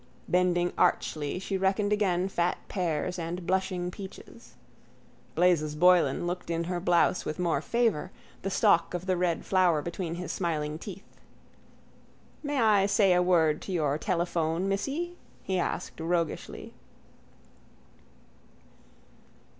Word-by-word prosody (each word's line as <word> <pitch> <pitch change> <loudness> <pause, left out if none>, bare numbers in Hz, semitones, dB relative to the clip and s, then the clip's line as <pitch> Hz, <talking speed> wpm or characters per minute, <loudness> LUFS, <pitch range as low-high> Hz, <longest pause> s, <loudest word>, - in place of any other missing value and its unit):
Bending 175 -1 +2
archly 150 +1 +1
she 195 +1 -3
reckoned 200 +2 +1
again 190 -3 +1
fat 175 -2 0
pears 175 -2 -2
and 170 +1 -4
blushing 185 -1 -1
peaches. 190 +1 -11 0.8
Blazes 160 -4 +2
Boylan 175 +1 +4
looked 175 0 -4
in 165 0 -1
her 175 +1 -2
blouse 175 0 +2
with 155 - -4
more 175 -2 0
favour, 225 -8 0 0.3
the 195 - -2
stalk 170 -2 +3
of 175 +1 -4
the 185 -1 +1
red 175 -2 -1
flower 180 -5 +3
between 170 0 -4
his 180 +1 -5
smiling 155 -3 -2
teeth. 195 +1 -10 1.2
—May 290 -2 -2
I 210 -4 +4
say 200 -2 +4
a 180 - +3
word 165 -4 +3
to - - -6
your 150 -4 0
telephone, 170 -1 -1
missy? 290 - -2 0.3
he 190 -1 -1
asked 175 - -3
roguishly. 165 0 -2
180 Hz, 125 wpm, -28 LUFS, 170-190 Hz, 1.2 s, Boylan